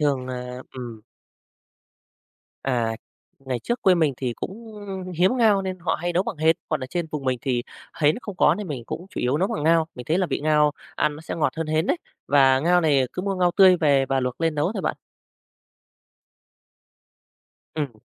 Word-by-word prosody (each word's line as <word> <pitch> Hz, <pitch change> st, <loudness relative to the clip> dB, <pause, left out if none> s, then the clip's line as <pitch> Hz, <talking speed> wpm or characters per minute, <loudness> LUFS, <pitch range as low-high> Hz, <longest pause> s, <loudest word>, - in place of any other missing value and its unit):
thường, 140 Hz, -4 st, +1 dB
à 125 Hz, 0 st, -5 dB, 0.2 s
ừm. 120 Hz, -4 st, -7 dB, 1.6 s
À, 115 Hz, -4 st, 0 dB, 0.4 s
ngày 130 Hz, -3 st, -3 dB
trước 240 Hz, -, -2 dB
quê 185 Hz, -1 st, +6 dB
mình 155 Hz, -5 st, +2 dB
thì 125 Hz, -2 st, -2 dB
cũng 220 Hz, +3 st, -7 dB, 0.4 s
hiếm 185 Hz, +9 st, +3 dB
ngao 210 Hz, -5 st, +4 dB
nên 185 Hz, -1 st, -4 dB
họ 175 Hz, -, -1 dB
hay 175 Hz, +2 st, -2 dB
nấu 180 Hz, +2 st, +2 dB
bằng 170 Hz, -, -5 dB
hến, 160 Hz, +1 st, +3 dB
còn 155 Hz, -3 st, -1 dB
ở 130 Hz, -, -4 dB
trên 170 Hz, +3 st, -3 dB
vùng 150 Hz, -3 st, -4 dB
mình 130 Hz, -1 st, 0 dB
thì 125 Hz, -3 st, 0 dB, 0.4 s
hến 150 Hz, 0 st, +4 dB
nó -, -, -6 dB
không 205 Hz, -3 st, -7 dB
có -, -, +5 dB
nên 205 Hz, -4 st, -6 dB
mình 130 Hz, -6 st, -5 dB
cũng 175 Hz, -, -6 dB
chủ -, -, -4 dB
yếu 125 Hz, +4 st, +1 dB
nấu 190 Hz, +5 st, +1 dB
bằng 225 Hz, -10 st, -3 dB
ngao. 165 Hz, 0 st, +4 dB
Mình 125 Hz, -, -8 dB
thấy 165 Hz, +4 st, +2 dB
là 185 Hz, -, +1 dB
vị -, -, -2 dB
ngao 150 Hz, -1 st, +3 dB, 0.2 s
ăn 150 Hz, -, +1 dB
nó 155 Hz, -, -10 dB
sẽ 160 Hz, -, -5 dB
ngọt 160 Hz, -, +1 dB
hơn 165 Hz, -, -2 dB
hến 155 Hz, +1 st, +1 dB
đấy, -, -, +2 dB, 0.3 s
và 135 Hz, -2 st, +5 dB
ngao 175 Hz, +3 st, +4 dB
này 140 Hz, -5 st, +3 dB
cứ 180 Hz, -, -4 dB
mua 195 Hz, -1 st, -1 dB
ngao 180 Hz, -1 st, +2 dB
tươi 190 Hz, -2 st, +7 dB
về 140 Hz, -5 st, +3 dB
và 135 Hz, -1 st, +1 dB
luộc 125 Hz, +2 st, -3 dB
lên 165 Hz, -1 st, +1 dB
nấu 150 Hz, +7 st, 0 dB
thôi 195 Hz, -5 st, -4 dB
bạn. -, -, -1 dB, 2.8 s
Ừm. 135 Hz, -9 st, -4 dB
155 Hz, 210 wpm, -24 LUFS, 130-180 Hz, 2.8 s, tươi